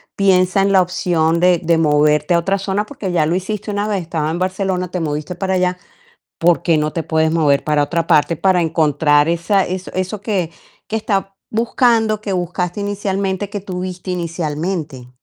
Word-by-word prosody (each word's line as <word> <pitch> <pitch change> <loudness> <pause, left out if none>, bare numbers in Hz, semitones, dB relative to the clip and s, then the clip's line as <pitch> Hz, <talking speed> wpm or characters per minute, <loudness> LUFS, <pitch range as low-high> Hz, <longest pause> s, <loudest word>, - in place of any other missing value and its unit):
piensa 185 -1 +3
en 195 +1 +2
la 190 - +6
opción 170 -2 0
de 180 -1 +4
de 165 0 +3
moverte 150 +1 +3
a 170 - +4
otra 195 +3 0
zona, 195 +2 -1
porque 210 -7 -5
ya 165 -3 +2
lo 160 - 0
hiciste 210 +3 -3
una 205 +1 -1
vez, 200 -3 -1
estabas 160 -2 -2
en 170 - -2
Barcelona, 185 -1 -1
te 180 - -2
moviste 150 +1 -3
para 190 0 -1
allá, 180 0 +1 0.6
¿por 170 0 +3
qué 165 -3 +2
no 150 0 -1
te 165 - -2
puedes 160 0 +1
mover 150 -4 +2
para 150 -1 +2
otra 165 +2 -2
parte 160 +3 +3
para 185 +2 +2
encontrar 150 -1 +2
esa 185 +4 +1
eso, 185 +1 -5
eso 185 +2 -3
que 190 -7 -1 0.4
que 220 - -2
estás 205 -3 0 0.3
buscando, 225 -1 +2
que 205 -2 -4
buscaste 180 +1 -2
inicialmente, 200 -1 -2
que 205 -1 -4
tuviste 185 -1 -5
inicialmente? 160 -5 -3
180 Hz, 185 wpm, -18 LUFS, 160-195 Hz, 0.6 s, la